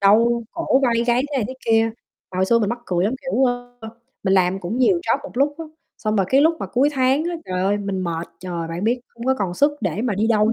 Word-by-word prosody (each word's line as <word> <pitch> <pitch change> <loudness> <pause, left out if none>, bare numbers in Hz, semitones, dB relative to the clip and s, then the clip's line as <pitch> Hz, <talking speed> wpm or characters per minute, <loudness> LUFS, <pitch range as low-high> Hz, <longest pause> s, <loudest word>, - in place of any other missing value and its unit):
đau 230 +4 +4
cổ 330 -5 +1
vai 245 -3 +3
gáy, 240 +1 +3
thế - - 0
này 235 - 0
thế 260 - -6
kia. 225 0 +3 0.4
Mà - - -5
hồi 190 - +3
xưa 230 +3 +4
mình 210 -3 0
mắc 240 +2 -2
cười 180 0 +1
lắm, 225 +6 0
kiểu, 265 -1 +1
ơ, 245 -1 -3 0.4
mình 190 -1 +2
làm 190 0 +2
cũng 200 +8 -3
nhiều 345 +8 +3
job 350 - +1
một 285 - -8
lúc 285 +3 +2
á, 325 - -5 0.3
xong 215 0 -1
rồi 195 -2 +2
cái 270 - +4
lúc 320 +3 +4
mà - - -3
cuối 265 +4 +2
tháng 265 +3 +2
á, 345 - -1
trời 185 0 -3
ơi 195 +2 +2
mình 200 -2 -3
mệt, 165 -1 -3
trời, 170 -2 -4
bạn 170 +4 -4
biết, 240 +3 +1
hông 235 0 -8
có 265 - +3
còn 190 -4 -2
sức 285 +9 +3
để 190 +1 -2
mà 240 -4 0
đi 210 +3 +1
đâu 220 -1 +3
230 Hz, 275 wpm, -21 LUFS, 195-260 Hz, 0.4 s, đau